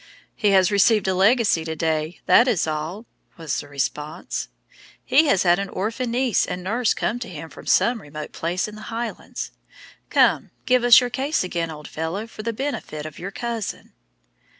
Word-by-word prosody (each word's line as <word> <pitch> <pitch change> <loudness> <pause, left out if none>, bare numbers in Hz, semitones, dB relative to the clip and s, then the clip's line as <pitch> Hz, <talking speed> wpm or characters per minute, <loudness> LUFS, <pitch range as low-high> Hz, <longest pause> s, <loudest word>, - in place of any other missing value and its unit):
"He 210 - +2
has 190 0 +4
received 205 0 +4
a 190 - +2
legacy 200 -2 +3
to 160 0 -4
day, 160 +1 -2
that 245 - +6
is 210 -9 +2
all," 160 +8 -4 0.3
was 160 -4 -2
the - - -8
response; 145 +2 -3 0.6
"he 290 +5 +4
has 195 -9 +3
had 175 0 +4
an 200 -1 -3
orphan 230 +6 -2
niece 245 -1 +2
and 180 - -4
nurse 225 +5 +1
sent 245 +3 -1
to 240 - -5
him 160 -2 -8
from - - -12
some 235 -2 +3
remote 150 -1 -8
place 175 +4 -2
in 210 - -9
the 215 0 -9
Highlands. 230 0 -5 0.6
Come, - - +3 0.2
give 255 -1 +3
us 245 +1 +8
your 245 -1 -2
case 275 +4 0
again, 170 -2 -2
old 150 -1 -8
fellow, 165 +7 -4
for 225 -1 -10
the 230 +2 -2
benefit 225 - -4
of 155 -1 -8
your 185 - -5
cousin." 230 0 -5
195 Hz, 185 wpm, -23 LUFS, 160-235 Hz, 0.6 s, us